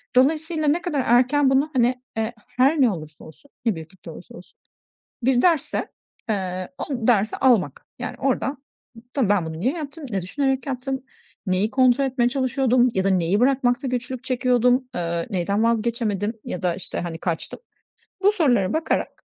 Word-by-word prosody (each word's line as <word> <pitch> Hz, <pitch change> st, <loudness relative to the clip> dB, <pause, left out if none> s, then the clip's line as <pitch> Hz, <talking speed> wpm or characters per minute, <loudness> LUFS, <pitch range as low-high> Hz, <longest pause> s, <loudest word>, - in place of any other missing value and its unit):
Dolayısıyla 310 Hz, +4 st, +2 dB
ne 315 Hz, +4 st, +2 dB
kadar 300 Hz, -6 st, -1 dB
erken 255 Hz, +4 st, +4 dB
bunu, 270 Hz, +3 st, +2 dB
hani, 250 Hz, 0 st, +2 dB, 0.2 s
eee, 225 Hz, +1 st, -1 dB
her 260 Hz, +5 st, +2 dB
ne 250 Hz, -4 st, +5 dB
olursa 155 Hz, -4 st, -8 dB
olsun, 275 Hz, -, -16 dB
ne 225 Hz, -4 st, +2 dB
büyüklükte 160 Hz, +3 st, -10 dB
olursa -, -, -12 dB
olsun, -, -, -15 dB, 0.6 s
bir 250 Hz, 0 st, +3 dB
dersse, 320 Hz, -5 st, +1 dB, 0.4 s
eee, 185 Hz, -3 st, -2 dB
o -, -, -4 dB, 0.2 s
dersi 220 Hz, -3 st, +2 dB
almak. 220 Hz, -, +2 dB
Yani, 250 Hz, -, -4 dB
oradan, 270 Hz, +1 st, -1 dB, 0.5 s
tabii 255 Hz, -8 st, +1 dB
ben 205 Hz, -5 st, +2 dB
bunu 160 Hz, 0 st, -6 dB
niye 255 Hz, -, +1 dB
yaptım, 310 Hz, -1 st, -7 dB
ne 195 Hz, -4 st, -2 dB
düşünerek 265 Hz, +7 st, -1 dB
yaptım, 265 Hz, 0 st, -3 dB, 0.4 s
neyi 190 Hz, +4 st, +1 dB
kontrol 260 Hz, +1 st, +4 dB
etmeye 245 Hz, -2 st, +1 dB
çalışıyordum 255 Hz, -1 st, +2 dB
ya 190 Hz, -, +1 dB
da 195 Hz, -, +2 dB
neyi 185 Hz, +1 st, +2 dB
bırakmakta 255 Hz, 0 st, +2 dB
güçlük 250 Hz, 0 st, -3 dB
çekiyordum, 250 Hz, 0 st, +2 dB
eee, 170 Hz, -1 st, -2 dB
neyden 200 Hz, +2 st, 0 dB
vazgeçemedim 225 Hz, -2 st, 0 dB
ya 180 Hz, -, -5 dB
da, 175 Hz, -2 st, +1 dB
işte, 180 Hz, -, -5 dB
hani, 170 Hz, -2 st, -4 dB
kaçtım? 170 Hz, -2 st, -4 dB, 0.6 s
Bu 405 Hz, +2 st, +5 dB
sorulara 245 Hz, -, +2 dB
bakarak 315 Hz, 0 st, -2 dB
245 Hz, 160 wpm, -23 LUFS, 195-270 Hz, 0.6 s, ne